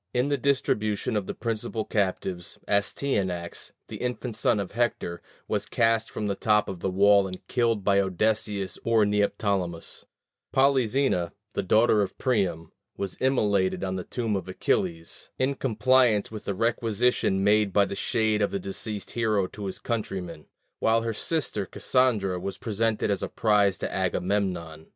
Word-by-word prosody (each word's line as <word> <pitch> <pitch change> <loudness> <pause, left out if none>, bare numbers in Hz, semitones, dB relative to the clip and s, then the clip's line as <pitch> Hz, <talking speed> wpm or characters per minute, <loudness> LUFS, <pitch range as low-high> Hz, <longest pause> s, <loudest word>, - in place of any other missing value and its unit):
In 125 +3 +2
the 145 - +1
distribution 110 -5 0
of 105 -3 -1
the - - -4
principal 115 -1 -3
captives, 95 -3 -2
Astyanax, 100 -5 -1 0.2
the - - -7
infant 125 -1 -3
son 110 -1 +2
of 100 - -4
Hector, 115 -7 -1 0.3
was - - -1
cast 115 0 +2
from 105 - -4
the 100 - 0
top 105 +1 +2
of 95 -3 -5
the 95 - -1
wall 100 +1 +5
and 90 -1 -9
killed 115 -5 +1
by 100 0 +4
Odysseus 100 0 -1
or 115 -2 +3
Neoptolemus: 100 -4 -1 0.5
Polyxena, 130 -8 +2 0.2
the - - 0
daughter 110 +2 +4
of 95 - -3
Priam, 95 - 0 0.3
was 100 -2 -4
immolated 105 -9 +1
on 95 -1 -2
the 90 - -3
tomb 115 -1 -2
of 95 -2 -3
Achilles, 85 -2 -2
in 130 +2 +1
compliance 125 -3 +2
with 110 -1 -8
a 100 - -1
requisition 115 -2 +1
made 105 0 +3
by 100 +1 +4
the - - -5
shade 110 +1 0
of 100 - +2
the - - -2
deceased 100 +2 -5
hero 110 -4 +1
to 100 +2 -7
his 95 - -5
countrymen; 95 -8 -4 0.3
while 115 0 +2
her 115 -1 -1
sister 110 - -2
Cassandra 110 -8 +1
was 95 +1 -5
presented 110 0 0
as 100 - -1
a - - -3
prize 100 -3 +2
to - - -4
Agamemnon. 90 -5 -1
105 Hz, 160 wpm, -26 LUFS, 95-115 Hz, 0.5 s, wall